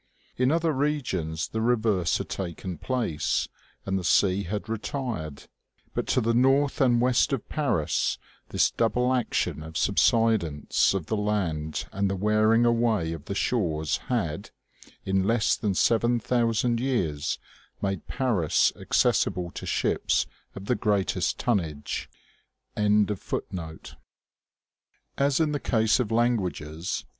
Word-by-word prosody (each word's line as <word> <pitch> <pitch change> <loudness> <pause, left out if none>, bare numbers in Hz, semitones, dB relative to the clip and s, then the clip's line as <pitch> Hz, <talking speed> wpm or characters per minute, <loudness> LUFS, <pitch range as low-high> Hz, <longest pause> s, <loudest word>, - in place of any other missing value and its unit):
In 125 +1 +2
other 165 0 +2
regions 95 - -1
the 110 - -3
reverse 110 -7 +2
had - - -5
taken 90 -2 -5
place, 110 - -1 0.4
and 95 0 0
the - - -6
sea 95 +3 +3
had 105 +4 -4
retired; 110 - -4 0.5
but - - -2
to - - +2
the 115 +1 +1
north 135 +4 +3
and 120 -3 +4
west 125 +4 +3
of 130 - -3
Paris 140 - 0 0.3
this - - +2
double 125 +2 +1
action 90 - -1
of 80 +1 -9
the - - -1
subsidence 105 -9 +2
of 95 -5 -2
the 110 - -1
land 90 -8 -1
and 100 0 0
the 95 - -1
wearing 110 +4 +3
away 115 -8 +1
of 80 -2 -8
the 100 - -4
shores 80 - 0
had, - - -2 0.6
in 95 0 +1
less 115 0 +2
than 105 -4 -1
seven 120 +4 +2
thousand 115 0 +1
years, 85 - -1 0.4
made 95 -4 -3
Paris 110 - +1
accessible 90 -1 +1
to - - -7
ships - - +1 0.3
of 95 - -8
the 125 - +1
greatest 105 -5 0
tonnage. 80 -11 -2
105 Hz, 115 wpm, -26 LUFS, 85-120 Hz, 0.6 s, and